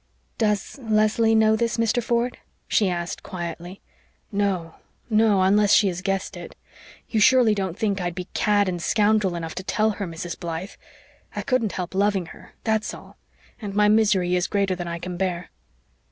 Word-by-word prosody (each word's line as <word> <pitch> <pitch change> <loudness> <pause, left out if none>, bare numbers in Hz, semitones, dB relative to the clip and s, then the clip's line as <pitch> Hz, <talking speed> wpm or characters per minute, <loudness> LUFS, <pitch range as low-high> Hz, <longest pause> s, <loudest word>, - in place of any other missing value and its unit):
"Does 210 +3 0
Leslie 220 0 +2
know 220 0 +4
this, 230 +1 -1
Mr. 230 +1 +1
Ford?" 235 +1 -1 0.3
she 205 -4 +2
asked 175 -1 -3
quietly. 175 0 -7 0.5
"No 195 -5 -1 0.4
no, 215 -3 +4
unless 205 +2 +4
she 205 - +5
has 180 0 -5
guessed 195 0 -2
it. 175 -1 -9 0.5
You 220 - 0
surely 240 0 +5
don't 190 -3 -3
think 205 -4 0
I'd 175 -1 -3
be 180 -1 -5
cad 205 -2 +2
and 175 -2 -2
scoundrel 210 -2 +2
enough 165 -1 -5
to 185 - -6
tell 215 +3 +1
her, 200 -2 -4
Mrs. 165 0 -6
Blythe. 170 +3 -5 0.6
I - - -3
couldn't 255 -6 0
help 180 -1 -4
loving 195 -1 +1
her - - -16
that's 220 -1 0
all - - -15 0.4
and 200 -2 -5
my 210 0 +4
misery 200 -5 +3
is 180 0 +1
greater 200 -2 0
than 175 -1 -5
I 170 0 -3
can 175 +1 -6
bear." 180 -2 -2
200 Hz, 175 wpm, -24 LUFS, 180-215 Hz, 0.6 s, she